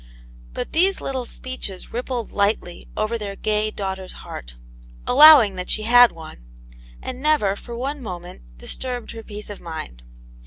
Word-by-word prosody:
But - - -5
these 375 +4 +3
little 260 -3 -4
speeches 255 -7 -6
rippled 245 -1 -3
lightly 200 -4 -1
over 225 +2 -1
their 200 -2 -5
gay 215 +1 0
daughter's 190 -3 -5
heart, - - -8 0.5
allowing 265 -8 +8
that 180 - -4
she 215 - +1
had 245 +2 +7
one, 160 - -11 0.6
and 255 0 -6
never, 290 -10 +2
for 235 +3 -8
one 275 +3 -3
moment, 180 - -8 0.2
disturbed 245 - -5
her 225 - -8
peace 210 -1 -8
of 205 - -9
mind. 110 - -7
215 Hz, 150 wpm, -22 LUFS, 190-250 Hz, 0.6 s, allowing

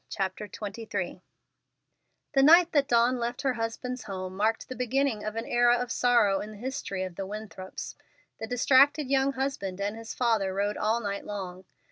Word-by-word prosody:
CHAPTER 195 +1 -3
XXIII 205 -4 -5 1.1
The 270 - +4
night 335 +4 +7
that 285 -3 +2
Dawn 240 0 +3
left 240 +3 -3
her 265 -2 +2
husband's 240 +2 -4
home 185 -1 -5
marked 220 +3 0
the 255 - -6
beginning 250 -2 0
of 215 0 -4
an 225 +1 -3
era 240 0 +4
of 245 0 -3
sorrow 225 -6 +3
in 210 - -6
the 215 - -10
history 240 -5 -4
of 185 -2 -7
the 195 - -4
Winthrops. 205 -2 -7 0.5
The 225 - -4
distracted 270 +3 +4
young 270 0 +3
husband 260 -9 -3
and 205 +2 -2
his 225 0 -8
father 220 -6 +1
rode 205 +1 0
all 220 +2 0
night 200 -2 -3
long. 190 -2 -6
225 Hz, 175 wpm, -28 LUFS, 200-255 Hz, 1.1 s, night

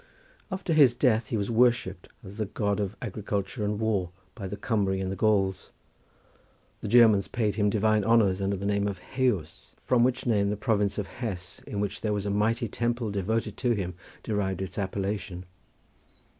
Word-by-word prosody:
After 185 -3 -2
his 140 -6 +6
death 120 -4 +2
he 115 - -1
was 100 +2 -2
worshipped 115 -6 +2 0.2
as 100 +1 -10
the 110 -2 -2
God 100 0 -1
of 100 0 -3
agriculture 105 0 -3
and 105 0 -1
war 105 -5 0 0.2
by 100 -5 -6
the 100 +2 -5
Cumry 100 -3 0
and 95 0 -2
the - - -3
Gauls. 95 -2 +1 1.1
The - - -5
Germans 110 -5 +6
paid 110 -4 0
him 105 0 +1
divine 110 +1 +2
honours 100 -4 +3
under 100 +1 0
the 100 - -5
name 100 0 +1
of 100 -2 -3
Heus, 100 -6 -2
from 125 -2 +2
which 130 0 +1
name 105 -4 +2
the 105 - -2
province 105 -1 +1
of 105 - -1
Hesse 95 -6 -6
in 100 - -4
which 105 - -3
there 105 -1 0
was 100 -1 -2
a 100 - -1
mighty 110 +3 +1
temple 120 0 -1
devoted 105 +2 -1
to 125 -2 +1
him 95 -4 -3 0.3
derived 95 -3 -1
its 95 - -6
appellation. 95 -1 -3
105 Hz, 185 wpm, -27 LUFS, 100-115 Hz, 1.1 s, his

